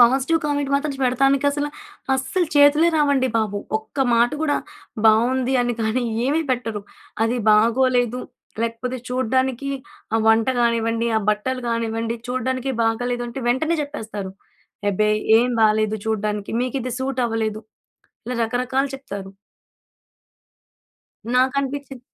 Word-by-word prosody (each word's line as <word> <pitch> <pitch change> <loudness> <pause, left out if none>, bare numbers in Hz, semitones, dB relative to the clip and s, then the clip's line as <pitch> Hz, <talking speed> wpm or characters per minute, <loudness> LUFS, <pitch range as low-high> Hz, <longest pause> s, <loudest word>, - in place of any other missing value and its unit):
Positive 265 +7 +4
comment 285 -1 -1
మాత్రం 285 +1 0
పెడతానికసల 275 +3 +2 0.5
అస్సల 270 +8 -1
చేతులే 290 +3 +6
రావండి 280 -3 +2
బాబు. 210 -2 0 0.2
ఒక్క 220 +6 -14 0.2
మాట 235 +1 +4
కూడా 290 -2 +1 0.5
బాగుంది 250 +4 +3
అని 245 - 0
కానీ 225 +3 0 0.2
ఏమీ 305 +5 +1
పెట్టరు. 230 -4 -2 0.4
అది 235 +2 0
బాగోలేదు 245 +2 +3 0.4
లేకపోతే 230 +2 -3
చూడ్డానికి 260 +1 0 0.5
ఆహ్, 225 - +2
వంట 225 +2 +4
కానివ్వండి, 230 0 +1
ఆహ్, 215 - 0
బట్టలు 255 +5 -2
కానివ్వండి, 230 0 -1
చూడ్డానికి 255 +1 -1
బాగోలేదు 240 +2 0
అంటే 240 +3 -6
వెంటనే 315 +7 +1
చెప్పేస్తారు. 215 -9 -6 0.6
ఎబ్బే! 210 +2 +1 0.3
ఏం 245 +2 +2
బాగాలేదు. 215 0 +3
చూడడానికి 210 -1 -2
మీకు 255 +2 -2
ఇది 255 -1 -4
సూట్ 260 -1 -1
అవ్వలేదు. 220 -1 -2 0.6
ఇలా 250 +1 -3
రకరకాలు 255 +4 0
చెప్తారు. 200 -8 -8 2.1
నాకనిపిచ్చింది. 270 +1 0
250 Hz, 115 wpm, -22 LUFS, 225-270 Hz, 2.1 s, చేతులే